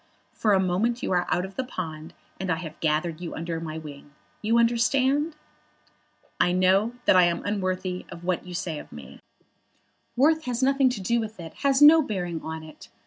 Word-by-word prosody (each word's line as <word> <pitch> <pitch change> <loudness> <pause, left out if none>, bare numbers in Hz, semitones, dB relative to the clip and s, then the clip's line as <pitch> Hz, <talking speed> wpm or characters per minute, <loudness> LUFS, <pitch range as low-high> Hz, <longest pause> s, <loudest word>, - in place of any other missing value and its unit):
For 215 -2 +1
a 190 - +4
moment 195 +7 0
you - - -1
are 180 -1 +1
out 180 - 0
of 190 - -11
the 260 - -1
pond, 160 -9 -7 0.2
and 190 -1 -3
I - - +2
have 160 -1 -8
gathered 160 +1 -1
you 170 - -5
under 165 0 -4
my 160 -1 -6
wing. 145 -2 -11 0.3
You 225 +2 +2
understand?" 265 +6 +2 1.0
"I 180 - +3
know 190 +5 +3
that - - +5
I 180 -1 +7
am 170 -1 -1
unworthy 185 -2 -2
of 170 - -10
what 180 -1 -1
you 180 -1 -8
say 165 -3 -3
of - - -12
me." - - -11 1.0
"Worth 315 +5 +3
has 250 0 -2
nothing 270 0 +4
to 240 -5 -4
do 235 +5 +1
with 220 -2 -6
it, 165 -2 -8
has 275 0 +3
no 315 +2 +9
bearing 180 - -3
on 160 0 -6
it. 155 -1 -13
185 Hz, 195 wpm, -25 LUFS, 170-235 Hz, 1.0 s, no